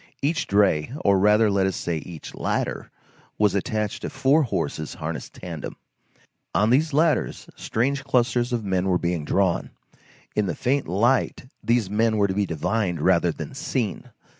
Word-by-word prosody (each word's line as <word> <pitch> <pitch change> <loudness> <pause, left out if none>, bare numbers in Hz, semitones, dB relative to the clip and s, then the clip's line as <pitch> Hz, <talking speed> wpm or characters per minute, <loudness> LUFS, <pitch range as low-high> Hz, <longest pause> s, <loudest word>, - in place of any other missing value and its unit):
Each 165 +4 0
dray, 100 -4 +2
or 100 -1 +5
rather 105 +2 +4
let 95 -1 +2
us 95 - -2
say, 85 -2 -2
each 80 -1 -9
ladder, - - -2 0.5
was 105 -3 +3
attached 105 +1 -2
to - - -4
four 140 +4 +3
horses 85 - -2
harnessed 80 +1 -6
tandem. 85 -5 -7 0.8
On 105 +3 +3
these 155 +5 +3
ladders 155 +2 +1
strange 135 +5 -1
clusters 125 -1 +1
of 120 -3 -1
men 95 -1 0
were 90 -2 +3
being 85 -3 -2
drawn. 95 -1 +1 0.7
In 105 -2 +1
the 90 - -2
faint 135 +2 0
light, 120 +9 +1 0.2
these 115 -3 +2
men 110 +2 +1
were 100 -1 +3
to 95 - -2
be 100 0 0
divined 90 +2 -1
rather 85 +1 +3
than - - -7
seen. 130 -6 -3
105 Hz, 165 wpm, -24 LUFS, 90-120 Hz, 0.8 s, or